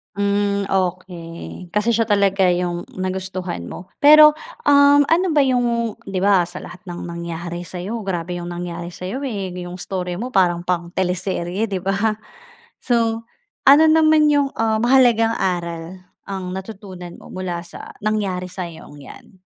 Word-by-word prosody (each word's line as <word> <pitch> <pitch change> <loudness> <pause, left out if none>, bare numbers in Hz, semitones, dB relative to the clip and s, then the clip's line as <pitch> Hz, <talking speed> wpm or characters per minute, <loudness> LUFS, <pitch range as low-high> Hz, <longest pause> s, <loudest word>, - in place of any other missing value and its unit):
Mm 200 0 0
okey, 180 -2 -4
kasi 210 +3 +2
siya 230 0 +1
talaga 195 -2 +3
yung 175 -1 -1
nagustuhan 185 - -4
mo. 180 +1 -10
Pero, 300 +1 +9 0.3
um, 285 0 +6
ano 335 +5 +2
ba 290 - +5
yung 240 -3 +1 0.2
'di 190 -1 -2
ba 190 -4 +4
sa 180 +1 -8
lahat 180 - -10
ng 175 0 -6
nangyari 170 0 -6
sa’yo, 190 +6 -5
grabe 180 -3 -3
‘yung 175 - -6
nangyari 175 0 -6
sa’yo 190 +9 -5
eh. 200 -6 -4
‘Yung 175 0 -7
estorya 180 -1 -4
mo 245 +7 -5
parang 175 -4 +2
pang 175 -1 -1
teleserye, 185 +2 -1
‘di 190 -3 -4
ba. 200 +3 0 0.7
So 230 -2 +1 0.4
ano 290 +4 +8
naman 315 -1 +5
yung, 285 -1 +2
ah, 220 -1 +1
mahalagang 240 -3 +4
aral 175 -1 -3 0.2
ang 190 -2 -5
natutunan 190 -3 -8
mo - - -14
mula 180 -2 -4
sa 175 - -11
nangyari 200 -4 -1
sa‘yong 170 -5 -8
'yan? 145 +6 -14
190 Hz, 145 wpm, -20 LUFS, 175-225 Hz, 0.7 s, Pero